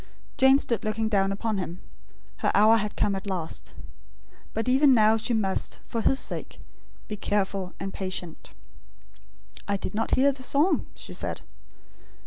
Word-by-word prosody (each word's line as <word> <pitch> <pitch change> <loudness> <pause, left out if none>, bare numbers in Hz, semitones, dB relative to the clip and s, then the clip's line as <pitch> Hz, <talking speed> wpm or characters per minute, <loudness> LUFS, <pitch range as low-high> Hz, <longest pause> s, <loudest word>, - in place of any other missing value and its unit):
Jane 265 0 +6
stood 235 -5 0
looking 220 +1 -1
down 195 -2 +2
upon 210 +1 -2
him. 180 -1 -5 0.6
Her - - +1
hour 215 +3 +6
had 210 -1 -3
come 205 - +1
at 195 +1 -5
last. 180 -5 -5 0.8
But 225 +2 -3
even 265 +1 +5
now 220 -1 +5
she 225 +2 -1
must, 195 -3 -1
for 230 - -3
his 265 - +3
sake, - - -4 0.5
be 210 - -4
careful 195 -2 -2
and 195 0 -5
patient. 185 -3 -4 1.2
"I 200 - 0
did - - -5
not 225 +2 0
hear 280 +2 +4
the 270 -1 -11
song," 290 +8 +2
she - - -4
said. - - -2
215 Hz, 155 wpm, -26 LUFS, 195-240 Hz, 1.2 s, Jane